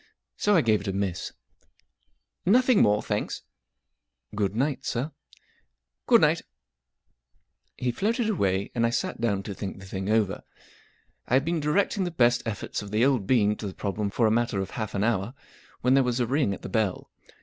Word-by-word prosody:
So 205 0 +2
I 170 - +5
gave 110 -5 +2
it 100 - -8
a 95 - -1
miss* 95 -2 -2 0.6
" - - -49
Nothing 255 -3 +4
more, 105 0 +3
thanks," - - -3 0.9
M - - -9
Good 100 -1 0
night, 135 +4 -1
sir/* 130 +6 -2 0.5
" - - -54
Good - - +6
night/* - - +3 1.4
He 125 -1 -1
floated 220 - 0
away, 100 - 0
and 115 - 0
I 115 - +3
sat 115 -1 -2
down 100 -4 0
to 100 - -5
think 95 0 -6
the 95 - -11
thing 95 +1 -4
over* 105 -2 +1 0.9
I 125 - +2
had 135 +2 +3
been 170 0 0
directing 190 +6 +1
the 180 - -1
best 120 -7 +3
efforts 110 -1 -4
of 105 - -8
the 110 +4 +2
old 130 -8 +1
bean 105 -5 +3
to 105 - -5
the 95 - -7
prob¬ 100 0 -4
lem 105 -1 0
for 115 +3 +1
a 110 - +3
matter 115 -3 +1
of 95 0 -4
half 110 -2 -4
an 100 - 0
hour, 115 +1 0 0.5
when 125 +1 +3
there 135 - +5
was 125 0 -1
a 120 - +2
ring 135 -2 +1
at - - -15
the - - -5
bell. 110 -4 -1
110 Hz, 205 wpm, -26 LUFS, 100-130 Hz, 1.4 s, Good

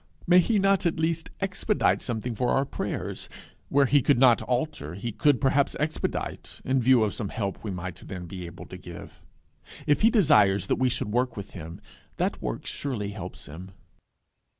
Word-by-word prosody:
May 180 +1 +6
he 215 +5 +2
not 195 -2 +3
at 165 - -2
least 160 0 0
expedite 195 +2 +1
something 120 0 -3
for 120 +2 -1
our 135 +2 +2
prayers? 135 - -5 0.4
Where 140 0 +4
he 140 +2 +4
could 140 +1 +3
not 125 -2 +5
alter, 125 - -2
he 115 +5 -4
could 130 +5 +2
perhaps 140 0 +2
expedite, 155 +1 -3
in 130 0 +2
view 125 -1 +5
of 105 - 0
some 105 -4 -3
help 100 -5 -4
we 110 - -4
might 90 -1 -5
then 90 -2 -6
be 90 0 -7
able 85 - -10
to - - -10
give. - - -11 0.6
If 145 - +2
he 220 - +6
desires 105 - +4
that - - 0
we 130 -1 +3
should 105 -3 -3
work 125 0 0
with 100 - -7
him, 85 +1 -8 0.4
that - - -1
work - - -4
surely 115 -8 -4
helps - - -8
him! 90 +6 -10
125 Hz, 185 wpm, -26 LUFS, 100-145 Hz, 0.6 s, May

